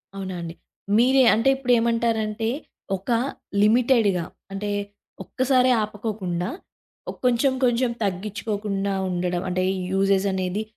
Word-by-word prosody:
అవునా 190 -1 -5
అండి? 165 0 -7 0.4
మీరే 260 +3 +5
అంటే 230 +5 +2
ఇప్పుడేమంటారంటే, 230 -3 +1 0.5
ఒక 190 - -13 0.5
లిమిటెడ్‌గా 220 -4 +3 0.3
అంటే, 205 +1 -3 0.5
ఒక్కసారే 255 +4 +2
ఆపకోకుండా, 205 -4 -3 0.8
కొంచెం 250 +2 +3
కొంచెం 240 0 +2
తగ్గించుకోకుండా 200 0 -2 0.2
ఉండడం, 180 0 -1
అంటే 185 0 0 0.3
యూజెస్ 195 0 +2
అనేది 190 +2 -2
210 Hz, 95 wpm, -24 LUFS, 190-235 Hz, 0.8 s, మీరే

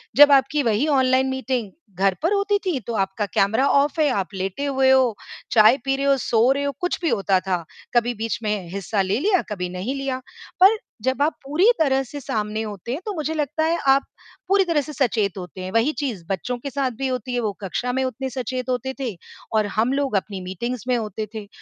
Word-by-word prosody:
जब 290 +1 +9
आपकी 280 +2 +4
वही 230 +4 +1
ऑनलाइन 260 -2 +3
मीटिंग 260 -5 -2 0.3
घर 195 0 +3
पर 340 +5 +2
होती 405 0 +2
थी, 345 -8 0
तो 235 0 -6
आपका 195 0 -1
कैमरा 220 +7 +3
ऑफ 285 +3 +2
है, 305 - +4
आप 200 -5 -2
लेटे 195 +8 -3
हुए 265 -1 +2
हो, 260 -4 +4 0.4
चाय 220 +2 +6
पी 270 0 +1
रहे 275 +1 -2
हो, 280 0 +5
सो 240 0 +3
रहे 280 +1 0
हो, 285 - 0
कुछ 355 - -1
भी 335 - +1
होता 195 -4 +2
था, 185 -2 -2 0.3
कभी 240 0 +3
बीच 225 0 -3
में 210 -5 -2
हिस्सा 200 +1 -1
ले 195 +4 0
लिया, 375 +3 +2
कभी 180 -3 -3
नहीं 185 +9 -4
लिया, 270 -2 -2 0.4
पर 405 +4 +7 0.3
जब 260 +2 0
आप 295 +1 +2
पूरी 300 +7 +1
तरह 270 -4 +3
से 285 +3 -8
सामने 215 -4 -2
होते 210 +1 -6
हैं, 275 - -2
तो 420 - -3
मुझे 310 -1 -2
लगता 305 0 -1
है 335 +1 +1
आप 270 +1 +5 0.4
पूरी 390 0 +4
तरह 330 -4 +2
से 300 +2 -8
सचेत 220 -8 0
होते 180 0 -8
हैं, 185 0 -5
वही 230 +7 +2
चीज़ 225 -11 -3
बच्चों 200 +6 -2
के 280 - -5
साथ 275 -1 -1
भी 270 - 0
होती 255 -1 -3
है, 245 - +1
वो 215 -3 -1
कक्षा 225 +6 -2
में 265 +1 0
उतने 260 +1 -3
सचेत 255 0 -4
होते 260 +1 -1
थे 245 -7 -3 0.4
और 215 -1 +3
हम 235 +4 +2
लोग 275 -4 0
अपनी 195 0 -4
मीटिंग्स 230 +7 -4
में 250 -1 +2
होते 215 -1 -4
थे, 210 -2 -6
255 Hz, 225 wpm, -22 LUFS, 210-280 Hz, 0.4 s, जब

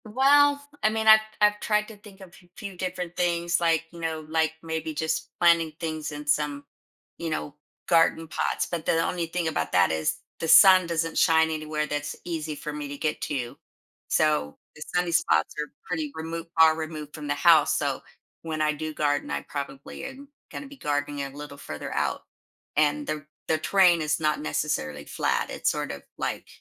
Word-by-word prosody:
Well, 285 +5 +4 0.2
I 215 - +4
mean, 220 0 -2
I've 220 0 +10 0.2
I've 210 0 +4
tried 210 0 +1
to 220 - -11
think 200 -1 -15
of 190 - -11
a 175 - -19
f - - -27
few 200 -3 -7
different 180 -1 -4
things, 175 -1 +1
like, 165 -1 +2
you 170 - -11
know, 160 -1 -3
like 160 0 +1
maybe 160 -1 -3
just 160 +2 -2
planting 170 -2 +4
things 155 -2 -4
in 150 0 -7
some, 145 -1 0 0.6
you 170 - -3
know, 150 -2 -3 0.3
garden 165 -1 +3
pots, - - -1
but 170 -2 -5
the 165 - +2
only 175 -2 -2
thing 170 0 -2
about 80 - -2
that 90 -2 +4
is 80 -1 0 0.2
the 165 - -2
sun 185 +2 +8
doesn't 165 -1 -1
shine 160 0 +4
anywhere 155 -1 -2
that's 145 0 -3
easy 160 -3 -3
for 150 +1 -6
me 150 -1 -5
to 140 0 -7
get 155 +1 -2
to. 125 -5 -3 0.5
So, 150 - +1 0.2
the 150 - -7
sunny 180 -1 +1
spots 80 - +2
are 150 - -2 0.2
pretty 155 -4 -2
removed 165 +1 -5
are 160 -1 +7
removed 155 -2 -6
from 150 -1 -7
the - - 0
house, - - +5
so - - -1 0.4
when 160 -1 -3
I 155 0 +2
do 155 +1 -5
garden, 145 -1 0
I - - -2
probably 140 -1 -6
am 275 +1 -9 0.2
gonna 285 - -7
be 280 0 -13
gardening 145 - -2
a 140 - -5
little 145 +1 -9
further 75 - -6
out. - - -1 0.5
And 150 -1 +2
the 155 -1 -3 0.2
the 155 - +1
terrain 180 -1 +4
is 155 0 0
not 155 -1 +1
necessarily 75 - -2
flat, - - -1
it's - - 0
sort - - -3
of - - -7 0.2
like - - -3
160 Hz, 195 wpm, -26 LUFS, 150-175 Hz, 0.6 s, I've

